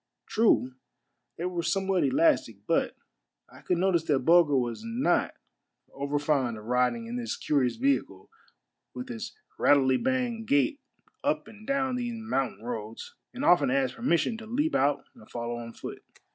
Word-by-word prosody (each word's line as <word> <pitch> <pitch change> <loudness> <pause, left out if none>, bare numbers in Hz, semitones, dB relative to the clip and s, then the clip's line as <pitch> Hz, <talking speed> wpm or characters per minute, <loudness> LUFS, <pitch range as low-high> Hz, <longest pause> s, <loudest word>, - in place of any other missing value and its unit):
True, 210 - +2 0.6
they 170 - -3
were 180 -1 -2
somewhat 190 +2 +1
elastic; 315 +3 +2
but - - +1 0.5
I - - -16
could 180 - 0
notice 175 -2 +2
that 145 -4 +2
Bulger 165 -4 +5
was 120 - -2
not 230 +5 0 0.6
over 140 +1 -2
fond 140 -6 0
of 105 - -11
riding 125 - +1
in 235 +2 -5
this 240 -1 -3
curious 135 -5 +1
vehicle 275 +3 -1 0.7
with 250 0 -6
its 225 - -6 0.2
rattlety 130 -3 +4
bang 250 -3 0
gait 285 +2 +2 0.4
up - - 0
and 215 0 -14
down 265 -2 0
these 240 -1 -3
mountain 135 - -2
roads, 115 -2 -6 0.2
and 260 +4 -4
often 145 -7 +5
asked 130 -1 +1
permission 225 0 0
to 220 - -10
leap 290 +8 0
out 140 +2 +2
and 110 - -17
follow 120 0 -4
on 115 -1 -7
foot. - - -9
175 Hz, 160 wpm, -28 LUFS, -, 0.7 s, Bulger